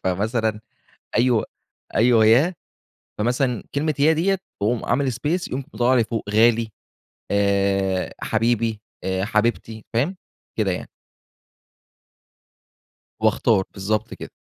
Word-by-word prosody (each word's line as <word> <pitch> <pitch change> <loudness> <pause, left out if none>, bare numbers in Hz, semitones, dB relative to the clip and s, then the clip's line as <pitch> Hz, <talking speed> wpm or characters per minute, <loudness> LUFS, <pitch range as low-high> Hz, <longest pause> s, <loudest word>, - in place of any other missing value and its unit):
فمثلًا 110 +3 0 0.6
أيوه 120 -2 +3 0.5
أيوه 115 -1 +5
يا، 140 +12 +4 0.6
فمثلًا 125 +1 0
كلمة 155 +2 0
"يا" 155 +3 +5
ديَّة 190 +5 +1 0.2
باقوم 110 +3 0
عامل 130 0 +1
space، 155 +9 -2
يقوم 135 +1 -4
مطلِّع 125 +2 +3
لي 120 -3 +3
فوق 110 -3 -4
"غالي" 115 +1 +3 0.6
آآ، 100 -2 +1
"حبيبي" 115 -1 0 0.2
آآ 95 0 -1
"حبيبتي"، 110 0 -1
فاهِم؟ 145 +12 0 0.4
كده 105 -3 +1
يعني. - - -5 2.3
وأختار 95 - +3
بالضبط 105 +2 -2
كده، - - -9
115 Hz, 110 wpm, -22 LUFS, 105-125 Hz, 2.3 s, أيوه